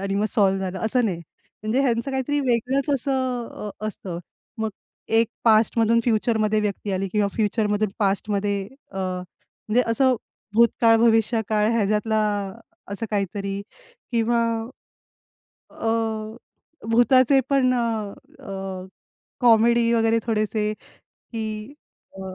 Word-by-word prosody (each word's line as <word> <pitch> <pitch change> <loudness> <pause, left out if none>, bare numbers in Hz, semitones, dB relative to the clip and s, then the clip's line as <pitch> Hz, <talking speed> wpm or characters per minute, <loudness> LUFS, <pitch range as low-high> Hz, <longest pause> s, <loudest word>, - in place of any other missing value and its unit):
आणि 195 0 -2
मग 205 +1 +1
सॉल्व्ह 195 -2 +2
झालं 190 0 -3
असं 245 +1 +2
नाही. 180 -6 -1 0.4
म्हणजे 225 +5 +1
ह्यांचं 240 +1 0
काहीतरी 265 +2 -1
वेगळंच 260 +2 0
असं 260 -3 -1
अ, 210 - -7 0.2
असतं. 180 -4 -6 0.4
मग 220 0 -1 0.5
एक 230 - +3 0.2
पास्टमधून 225 +1 +4
फ्युचरमध्ये 220 -2 +2
व्यक्ती 205 -1 -2
आली 190 +1 -1
किंवा 210 -2 +2
फ्युचरमधून 210 -1 +1
पास्टमध्ये 200 0 0 0.3
अ, - - -9
म्हणजे 185 +5 -3
असं 260 +2 +3 0.4
भूतकाळ, 230 0 +5
भविष्यकाळ 220 -2 +2
ह्याच्यातला 215 0 +1 0.7
असं 225 +3 -3
काहीतरी 200 0 -2 0.5
किंवा 235 0 +2 1.3
अ, 225 -1 -2 0.5
भुताचे 255 +3 +5
पण 260 -2 +3
अ, 225 -4 -1 0.3
अ, 190 -1 -6 0.6
कॉमेडी 235 0 +5
वगैरे 225 0 +3
थोडेसे 215 -1 0 0.4
की 220 +2 -6 0.5
अ, - - -7
220 Hz, 110 wpm, -23 LUFS, 205-235 Hz, 1.3 s, भूतकाळ